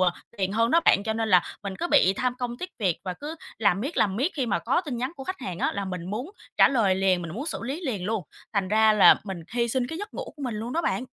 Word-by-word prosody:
ờ, 185 -1 +4 0.3
tiền 190 0 -1
hơn 230 +2 +2
đó 335 - +5
bạn, 200 - +5
cho 220 +1 -1
nên 225 0 -1
là 180 -3 +6 0.2
mình 195 -1 -4
cứ 345 - -1
bị 195 -10 +5
tham 250 -1 0
công 245 -1 -3
tiếc 365 0 -5
việc 185 -6 +1
và 185 -1 -3
cứ 300 - -7 0.2
làm 200 -3 +2
miết, 285 +7 -4
làm 195 -2 +2
miết, 275 - 0
khi 265 -5 -1
mà 170 - +1
có 260 - +1
tin 285 -9 -5
nhắn 255 +6 -3
của 270 - -7
khách 370 0 -5
hàng 180 -1 -5
á - - 0
là 200 -1 -3
mình 180 -1 -5
muốn 245 - -4 0.3
trả - - +7
lời 225 -8 +2
liền, 190 -1 +2
mình 165 - -6
muốn 280 +7 -5
xử - - -3
lý 275 +8 -4
liền 210 -9 -2
luôn, 215 0 -1 0.3
thành 195 -3 0
ra 220 +1 +5
là 210 - +7
mình 190 -4 -5
hy 235 -1 +1
sinh 250 +1 0
cái 325 +4 -6
giấc 415 +1 -7
ngủ - - -3
của 290 - -9
mình 245 -4 -2
luôn 225 +3 -4
đó 335 - 0
bạn. 255 - -1
225 Hz, 300 wpm, -26 LUFS, 195-265 Hz, 0.3 s, trả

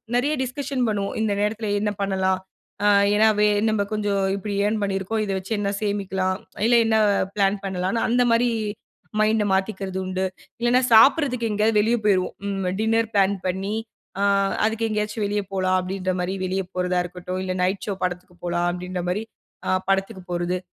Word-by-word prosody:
நிறைய 275 +5 +2
டிஸ்கஷன் 260 0 -2
பண்ணுவோம், 200 -2 -2
இந்த 215 -2 +1
நேரத்தில 215 +1 -1
என்ன 210 0 0
பண்ணலாம்? 190 -1 +1 0.5
அ - - +5 0.3
ஏன்னா 215 +1 +5
வே 210 - +5 0.2
நம்ம 215 -1 +1
கொஞ்சம் 205 -2 0 0.2
இப்பிடி 200 +1 -4
ஏர்ன் 215 +1 0
பண்ணியிருக்கோம், 195 +2 -1
இத 200 - -3
வச்சு 190 +4 -12
என்ன 200 -1 0
சேமிக்கலாம்? 190 -2 -1 0.3
இல்ல 240 - +5
என்ன 220 0 +3 0.4
பிளான் 200 0 +2
பண்ணலான்னு 190 +3 -1
அந்தமாரி 240 0 +3 0.7
மைண்ட 215 0 +3
மாத்திக்கிறது 190 -1 -1
உண்டு. 185 0 -1 0.3
இல்லன்னா, 240 +2 +3
சாப்பிடுறதுக்கு 250 0 +5
எங்கேயாவது 210 +1 +2
வெளியே 225 +3 +2
போயிருவோம் 190 -3 +2
ம் 195 -2 -2
டின்னர் 225 0 +1
பிளான் 200 0 +4
பண்ணி 190 +3 -2 0.5
அ - - +2 0.4
அதுக்கு 225 +1 0
எங்கேயாச்சும் 215 0 -1
வெளியே 205 0 -1
போலாம் 185 -1 +2
அப்பிடின்றமாரி 185 0 -2
வெளிய 190 +1 -1
போறதா 180 0 +1
இருக்கட்டும், 180 +1 -5
இல்ல 185 -1 -2
"நைட் 190 +2 -1
ஷோ" 205 - 0
படத்துக்கு 180 0 -4
போகலாம் 175 0 0
அப்பிடின்றமாரி 180 +2 -3 0.4
அ - - 0 0.2
படத்துக்கு 195 0 0
போறது. 175 +1 -1
200 Hz, 155 wpm, -23 LUFS, 185-220 Hz, 0.7 s, அ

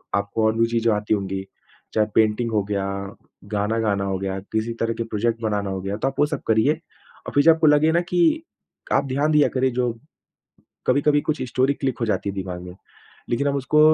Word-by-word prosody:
आपको 100 +2 0
और 110 - +3
भी 115 - +5
चीज़ें 115 -1 +1
आती 105 +1 -1
होंगी। 95 -1 -2 0.5
चाहे 110 -1 +2
पेंटिंग 110 +1 +2
हो 105 -2 +1
गया, 100 -1 -2 0.7
गाना 105 +3 0
गाना 100 -1 +1
हो - - 0
गया, 95 0 -3
किसी 110 +3 -3
तरह 115 0 0
के 115 - -3
प्रोजेक्ट 115 +1 -1
बनाना 105 -2 -1
हो 95 -1 -3
गया, 100 +1 -3
तो 130 - -1
आप 135 - -3
वो 145 - +5
सब - - -9
करिए। 110 +7 +4 0.5
और - - -4
फिर 145 - +4
जब 165 - +8
आपको 160 -1 +2
लगे 150 +2 +5
ना 170 +1 +3
कि 180 - +3 0.5
आप 140 - +3
ध्यान 140 +4 0
दिया 150 -1 +5
करिए 130 0 +2
जो 120 -1 +1 1.0
कभी-कभी 145 +3 +3
कुछ 155 - -2
स्टोरी 130 +3 +2
क्लिक 135 -3 -3
हो 115 - 0
जाती 105 -2 -1
है 100 - -5
दिमाग 90 -2 -5
में, 90 0 -10 0.5
लेकिन 120 +4 0
हम 140 - +1
उसको 140 +3 +1
115 Hz, 215 wpm, -23 LUFS, 100-140 Hz, 1.0 s, जब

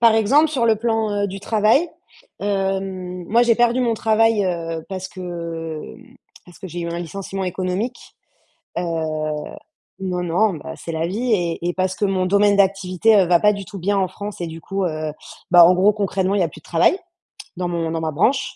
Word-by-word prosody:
Par 230 -2 +6
exemple, 275 +9 +4
sur 265 -6 0
le 225 -1 +4
plan, 225 -1 0
heu, - - +1
du 195 0 -7
travail, 220 +11 +2 0.5
hem, 190 -2 -2
moi, 235 +3 +4
j'ai 235 -1 +4
perdu 240 +2 +2
mon 235 -2 +1
travail, 220 -1 +2
heu, 165 -3 -3
parce 190 -1 -5
que, 185 - -11 0.6
hem, 250 +1 -13 0.3
parce 175 - -16
que 190 - -8
j'ai 175 +2 -6
eu 170 - -3
un 170 0 -3
licenciement 190 +3 -5
économique, 185 +6 -3 0.6
heu, - - -1 1.2
non, 180 -2 -2
non, 180 +4 +1
bah, 160 +1 -7
c'est 165 - -8
la 160 +1 -1
vie 230 +7 -1
et 175 -3 0
et 175 - -2
parce 185 0 0
que 205 - -2
mon 190 -2 +1
domaine 200 +1 +4
d'activité, 195 +2 +3
heu, 190 -3 +5
va 175 0 +5
pas 210 0 +5
du 200 -1 -6
tout 195 - -9
bien 200 +3 0
en 190 -2 +1
France 205 +1 -8
et 170 - -2
du 165 0 -8
coup, 195 +3 -3
heu, 155 -2 -3 0.4
bah, 175 -1 +9
en 180 - +5
gros, 195 +4 +4
concrètement, 195 -1 -1
il - - +2
y - - +4
a - - -1
plus 155 - -13
de - - -42
travail 170 - +3 0.6
dans 180 -1 -2
mon 170 -2 -2
dans 165 0 -2
ma 160 -1 -1
branche, 245 - +1
190 Hz, 215 wpm, -21 LUFS, 175-215 Hz, 1.2 s, bah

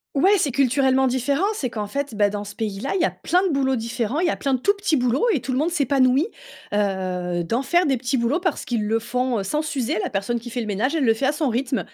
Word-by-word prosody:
Ouais, 360 +8 +4
c'est 285 - +1
culturellement 265 0 +2
différent. 260 +6 +1
C'est 275 - -3
qu'en 215 -2 -4
fait, 280 +2 -4
bah, 205 -1 +3
dans 205 0 -4
ce 205 0 -9
pays-là, 215 +3 -3
il 380 - +1
y - - +4
a - - 0
plein 360 +2 0
de - - -1
boulots 265 -1 +1
différents, 235 +3 -2
il 355 - +1
y - - +2
a - - -1
plein 275 -1 0
de - - -3
tout 400 +11 +3
petits 400 -5 0
boulots 250 - +1
et 300 - 0
tout 260 - -4
le 255 - 0
monde 315 +4 +1
s'épanouit, 275 - +2 0.5
heu, 185 -3 -1
d'en 230 +9 -1
faire, 345 +6 +2
des 270 -3 +2
petits 260 +2 -1
boulots, 240 +7 +1
parce 360 0 -2
qu'ils 235 -3 -1
le 225 +1 +2
font, 250 0 -1
heu, - - -2
sans 300 +10 -1
s'user. 280 -8 -2
La - - -2
personne 205 +4 -2
qui 240 +1 -9
fait 245 +1 -3
le - - -4
ménage, 215 +9 0
elle 300 -5 +1
le 225 - +5
fait 225 +5 -2
à - - +3
son 295 -2 0
rythme. 255 +2 -1
255 Hz, 280 wpm, -22 LUFS, 225-285 Hz, 0.5 s, le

